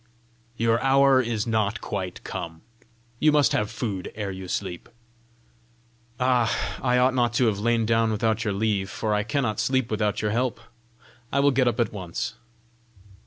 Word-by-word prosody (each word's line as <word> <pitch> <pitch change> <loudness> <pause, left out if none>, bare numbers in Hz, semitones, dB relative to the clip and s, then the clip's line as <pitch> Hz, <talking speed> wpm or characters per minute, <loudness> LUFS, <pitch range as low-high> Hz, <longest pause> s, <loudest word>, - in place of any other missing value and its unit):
"Your 115 +1 +2
hour 135 0 +5
is 115 -3 -2
not 110 -2 0
quite 95 -4 -5
come. 80 -1 -6 0.6
You 155 - +4
must 150 -1 +4
have 105 0 0
food 100 -7 -4
ere 105 -2 -3
you 95 0 -7
sleep." 90 -1 -4 1.3
"Ah, 125 -3 +3 0.3
I 125 -1 +2
ought 125 +1 +4
not 120 -2 +1
to 125 +1 +3
have 105 -3 +1
lain 115 +1 +1
down 115 0 +2
without 110 +1 0
your 105 -3 -1
leave, 100 -2 0
for 110 0 -2
I 105 - +2
cannot 110 -1 -1
sleep 130 -3 0
without 105 -1 0
your 105 -1 0
help! 120 +1 -1 0.7
I 140 - +1
will 140 +1 +4
get 130 -1 +2
up 120 -1 0
at 115 -3 +1
once!" 90 -5 -4
110 Hz, 165 wpm, -25 LUFS, 105-125 Hz, 1.3 s, hour